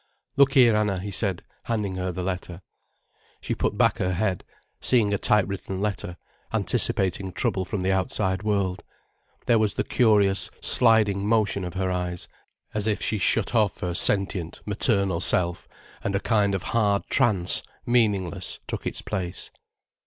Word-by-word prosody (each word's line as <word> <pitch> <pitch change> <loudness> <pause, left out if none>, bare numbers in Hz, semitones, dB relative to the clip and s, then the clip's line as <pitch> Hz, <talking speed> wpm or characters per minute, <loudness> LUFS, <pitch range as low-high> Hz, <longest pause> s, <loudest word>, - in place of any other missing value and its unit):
"Look 140 -1 +4
here, 120 -5 +6
Anna," 105 -3 0
he 100 +3 -5
said, 95 -2 -1 0.2
handing 105 -4 -2
her 90 0 -2
the 90 0 -5
letter. 90 -1 -5 0.8
She - - -3
put - - -2
back - - +2
her 90 0 0
head, 95 -1 -1 0.4
seeing 110 -5 +2
a 100 - 0
typewritten 100 -3 0
letter, 100 -3 -3 0.3
anticipating 95 0 0
trouble 95 +1 -1
from 95 +1 -3
the 95 +1 +1
outside 95 0 -1
world. 100 -4 -1 0.6
There 115 - +3
was 110 -2 0
the - - 0
curious, 105 -5 +2
sliding 105 -4 +3
motion 110 -3 +1
of 90 +1 -6
her 95 0 -1
eyes, 90 -1 -3 0.5
as 105 0 -1
if 105 - 0
she 110 - -1
shut 110 +4 +1
off 110 -4 +1
her 90 -1 -2
sentient, 95 -2 +1
maternal 100 - +1
self, 85 0 0 0.4
and 100 - -1
a - - +2
kind 100 -2 +1
of 95 - -4
hard 105 -3 +1
trance, 105 -9 +3 0.2
meaningless, 100 -7 0
took - - -5
its - - -3
place. 90 -4 -4
100 Hz, 155 wpm, -25 LUFS, 95-105 Hz, 0.8 s, here